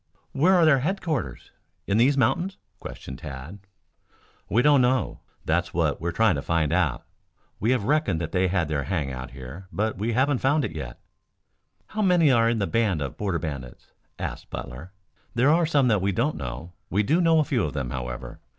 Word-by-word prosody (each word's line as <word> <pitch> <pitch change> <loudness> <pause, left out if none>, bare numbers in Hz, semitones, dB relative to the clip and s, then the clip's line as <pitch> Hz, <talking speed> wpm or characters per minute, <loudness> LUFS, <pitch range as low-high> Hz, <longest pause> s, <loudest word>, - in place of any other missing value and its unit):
"Where 170 +8 +4
are 175 -2 +5
their 145 -4 +5
headquarters 160 - -3 0.3
in 100 - +1
these 135 +5 +4
mountains?" 170 +9 +1 0.2
questioned 65 0 -8
Tad. 75 +6 -8 0.9
"We 115 +6 +3
don't 145 -2 +5
know. 125 +1 +1 0.3
That's 85 +2 0
what 80 -4 0
we're 85 +1 -1
trying 110 +3 +3
to 70 - -2
find 80 -1 0
out. - - 0 0.5
We 110 - 0
have 125 -4 +2
reckoned 145 - +1
they 90 +3 0
had 90 -3 0
their 75 -2 -2
hang 80 -8 -2
out 65 0 -6
here, 65 +8 -10
but 110 0 -2
we 115 +3 -1
haven't 130 +2 +2
found 145 +2 +2
it - - -4
yet" 65 -6 -6 0.9
"How 215 - -4
many 175 -7 +4
are 115 -2 +4
in 115 - +1
this 100 -3 -1
band 110 -8 +1
of 70 -2 -4
Border 95 -4 -1
Bandits?" 70 -7 -7 0.3
asked - - -6
Butler. 70 +9 -7 0.4
"There 130 +5 +4
are 165 0 +3
some 145 -5 +3
that 105 -4 +2
we 100 +1 +1
don't 120 +10 0
know. 75 +6 -6 0.2
We 105 +3 +1
do 160 - +2
know 165 -1 +4
a 155 - +4
few 130 -7 0
of 75 - -3
them, 70 -5 -3
however. 60 -1 -6
100 Hz, 195 wpm, -25 LUFS, -, 0.9 s, are